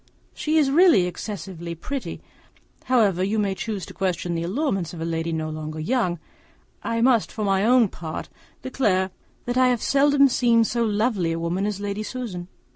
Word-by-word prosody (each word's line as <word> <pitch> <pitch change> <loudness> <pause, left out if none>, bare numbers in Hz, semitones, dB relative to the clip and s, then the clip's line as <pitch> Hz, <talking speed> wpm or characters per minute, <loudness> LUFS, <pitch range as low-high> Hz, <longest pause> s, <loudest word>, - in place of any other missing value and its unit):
She 310 +1 0
is 285 -3 +3
really 330 - +6
excessively 180 -2 -6
pretty; 270 - -5 0.6
however 210 -8 +3
you 205 +3 0
may 200 -2 +1
choose 200 -2 -4
to - - -11
question 180 -2 -2
the 165 - -2
allurements 195 - -2
of - - -8
a 165 - -3
lady 165 0 -2
no 155 -1 -2
longer 155 0 -6
young, 180 0 0 0.6
I 230 0 -1
must, 235 -3 +3
for 215 - -4
my 195 0 +2
own 240 0 +5
part, 160 -4 -6 0.4
declare 190 -8 +1 0.3
that 245 +1 -2
I 255 - +5
have 245 -3 +1
seldom 280 0 +4
seen 235 -2 +3
so 235 +1 0
lovely 210 -5 0
a - - -3
woman 175 +4 -1
as 205 -2 -3
Lady 205 +1 -3
Susan. 215 -7 -5
205 Hz, 180 wpm, -24 LUFS, 175-245 Hz, 0.6 s, really